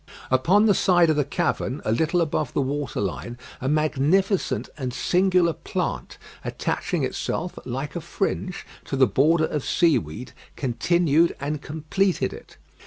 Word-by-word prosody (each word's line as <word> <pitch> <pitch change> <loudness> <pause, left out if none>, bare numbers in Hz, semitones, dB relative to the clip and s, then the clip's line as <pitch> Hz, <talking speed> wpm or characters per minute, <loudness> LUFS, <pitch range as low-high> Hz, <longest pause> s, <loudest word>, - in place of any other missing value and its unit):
Upon 175 +12 +4
the 210 - +5
side 175 -4 +4
of - - +1
the 145 - +2
cavern, 135 -1 -1
a 110 - +1
little 160 +9 +2
above 155 -4 -1
the - - +2
water 140 -1 -3
line, 105 +5 -4 0.2
a 130 - -1
magnificent 155 +6 +1
and 130 -4 -4
singular 180 +4 +2
plant, - - -4 0.3
attaching - - -2
itself, 175 +1 -3
like 135 +5 -4
a 170 - -3
fringe, 185 +1 -3 0.2
to - - -3
the 135 -1 +5
border 155 - +3
of 150 -3 -3
seaweed, 125 - +1 0.2
continued 165 +5 +2
and 145 +1 -3
completed 160 +6 -1
it. - - -13
155 Hz, 145 wpm, -24 LUFS, 135-175 Hz, 0.3 s, the